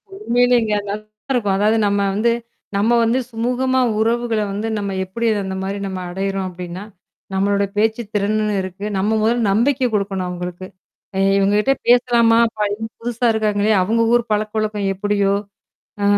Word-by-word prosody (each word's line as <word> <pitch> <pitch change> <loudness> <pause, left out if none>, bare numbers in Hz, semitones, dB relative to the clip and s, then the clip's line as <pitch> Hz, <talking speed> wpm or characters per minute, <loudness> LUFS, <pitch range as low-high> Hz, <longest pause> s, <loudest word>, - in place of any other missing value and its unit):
உண்மையிலேங்க, 245 - +2 0.2
நல்லா 200 - -1 0.4
இருக்கும். 205 -6 +1
அதாவது, 215 +2 +3
நம்ம 200 0 +1
வந்து 230 +3 +2 0.4
நம்ம 210 +4 +2
வந்து 230 +3 +2
சுமூகமா 250 +3 0 0.2
உறவுகள 230 0 +1
வந்து 210 +3 -3
நம்ம 200 -1 -3
எப்பிடி 210 +6 -4 0.2
அந்தமாரி 190 +1 -4
நம்ம 190 -1 -5
அடையிறோம் 195 +1 -2
அப்பிடின்னா, 180 +1 -7 0.5
நம்மளோட 200 +1 +1
பேச்சு 220 +2 +1
திறன்னு 210 +1 0
இருக்கு. 190 +2 -6
நம்ம 195 +2 0
முதல்ல 230 +1 +2
நம்பிக்கை 250 +5 +2
குடுக்கணும் 195 -2 -1
அவுங்களுக்கு. 180 +1 -6 0.5
ஏ - - +1 0.2
இவுங்ககிட்ட 205 +6 +3
பேசலாமா! 235 -1 +4 0.2
பையன் 210 +2 -2
புதுசா 240 +1 -2
இருக்காங்களே! 210 -1 +1
அவுங்க 225 +5 +2
ஊர் 240 0 +4
பழக்க 210 0 0
வழக்கம் 210 -2 -1
எப்பிடியோ! 200 0 +1 0.7
ஆ, - - +1
210 Hz, 140 wpm, -19 LUFS, 195-230 Hz, 0.7 s, பேசலாமா